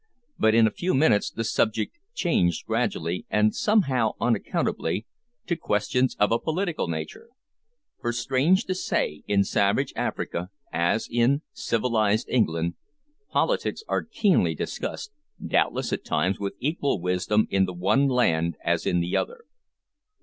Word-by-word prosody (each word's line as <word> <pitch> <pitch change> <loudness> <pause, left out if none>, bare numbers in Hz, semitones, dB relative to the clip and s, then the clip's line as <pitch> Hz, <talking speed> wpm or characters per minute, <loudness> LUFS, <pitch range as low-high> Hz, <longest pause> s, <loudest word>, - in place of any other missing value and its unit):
But 110 0 +4
in 115 -1 +6
a 110 - +2
few 175 - -1
minutes 130 -7 +3
the 115 - -4
subject 110 - 0 0.2
changed 90 - +1
gradually, 85 +2 -2
and 105 0 +3
somehow 135 - +2
unaccountably, 115 -3 -1 0.4
to 170 - 0
questions 125 -2 0
of 105 - +3
a 115 - +3
political 170 - -2
nature, 80 - -6 0.7
for, 120 - -1
strange 135 - +2
to 185 - -1
say, 75 - -1
in 100 -1 +3
savage 100 +7 +1
Africa, 90 +1 -3 0.2
as 85 +6 +1
in 125 +6 +2
civilised 110 -2 0
England, 85 -8 +1 0.6
politics - - 0
are - - 0
keenly 190 - +2
discussed, 140 - -5 0.3
doubtless - - 0
at - - -2
times 80 +5 0
with 100 -1 -3
equal 140 - -1
wisdom 90 +4 +1
in 95 -1 +3
the 90 - -5
one 95 +11 +2
land 85 - +1
as - - +1
in 90 - +2
the 85 +1 -2
other. 475 -1 -2
110 Hz, 140 wpm, -25 LUFS, 90-140 Hz, 0.7 s, in